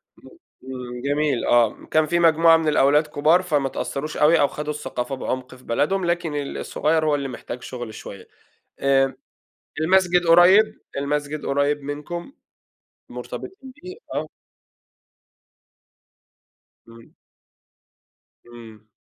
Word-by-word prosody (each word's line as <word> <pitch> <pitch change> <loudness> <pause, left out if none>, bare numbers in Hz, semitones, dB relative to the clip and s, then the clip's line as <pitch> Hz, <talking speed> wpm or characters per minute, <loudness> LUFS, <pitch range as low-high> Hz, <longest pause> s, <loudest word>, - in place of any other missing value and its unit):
إمم، - - -17 0.4
إمم، 125 -1 -7
جميل 145 -1 0
آه، 120 -2 +2
كان 155 0 +3
في 170 +3 0
مجموعة 165 0 +5
من 160 -1 -2
الأولاد 150 +1 +3
كبار 155 +5 +3
فما 145 -7 0
اتأثروش 145 +3 -5
أوي 160 +3 +4
أو 140 - +4
خدوا 150 +1 -5
الثقافة 135 -2 -4
بعمق 130 0 -5
في 125 - -19
بلدهم، 175 +10 0
لكن 170 -3 -1
ال 145 -1 -4
الصغير 155 +1 0
هو 150 -1 +2
اللي 140 -1 -3
محتاج 125 0 -8
شغل 120 -3 -7
شوية، 100 -2 -10 0.5
آآ 135 -1 +2 0.7
المسجد 180 0 +3
قريب 180 +6 +5 0.2
المسجد 145 +1 -3
قريب 145 +1 0
منكم؟ 150 - -6 0.8
مرتبطين 270 -9 -9
بيه، 365 +2 -8 0.2
آه. - - -3 2.6
إمم. 115 0 -16 1.3
إمم. 115 -2 -14
150 Hz, 120 wpm, -22 LUFS, 135-165 Hz, 2.6 s, مجموعة